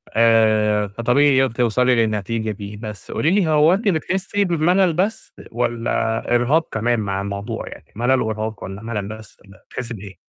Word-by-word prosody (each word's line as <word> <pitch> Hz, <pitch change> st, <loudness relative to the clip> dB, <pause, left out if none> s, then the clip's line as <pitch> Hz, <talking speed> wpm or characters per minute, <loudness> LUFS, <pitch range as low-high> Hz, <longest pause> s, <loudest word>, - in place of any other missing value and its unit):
آآ 110 Hz, -2 st, +3 dB
فطبيعي 125 Hz, +6 st, +2 dB
ي -, -, -2 dB
توصلي 125 Hz, +2 st, +2 dB
للنتيجة 110 Hz, 0 st, -1 dB
دى 105 Hz, 0 st, -8 dB
بس 105 Hz, -3 st, -8 dB
قولي 160 Hz, -, +1 dB
لي 195 Hz, -4 st, +2 dB
هو 155 Hz, +2 st, +4 dB
أنتِ 210 Hz, +3 st, -1 dB
بتحسّي 190 Hz, +3 st, 0 dB
بِمللّ 175 Hz, +1 st, +2 dB
بس 195 Hz, +7 st, -2 dB, 0.2 s
والّا 115 Hz, -1 st, -1 dB
إرهاق 140 Hz, +7 st, +2 dB
كمان 115 Hz, +1 st, 0 dB
مع 100 Hz, -2 st, -2 dB
الموضوع 100 Hz, 0 st, -5 dB
يعني -, -, -12 dB
ملل 125 Hz, +4 st, +2 dB
وإرهاق، 110 Hz, -1 st, -3 dB
والّا 95 Hz, +2 st, -7 dB
ملل 110 Hz, -3 st, -4 dB
بس 110 Hz, +1 st, -10 dB
والّا 100 Hz, 0 st, -19 dB
بتحسّى 120 Hz, -1 st, -5 dB
بأيه؟ 100 Hz, -3 st, -10 dB
115 Hz, 165 wpm, -20 LUFS, 105-145 Hz, 0.2 s, هو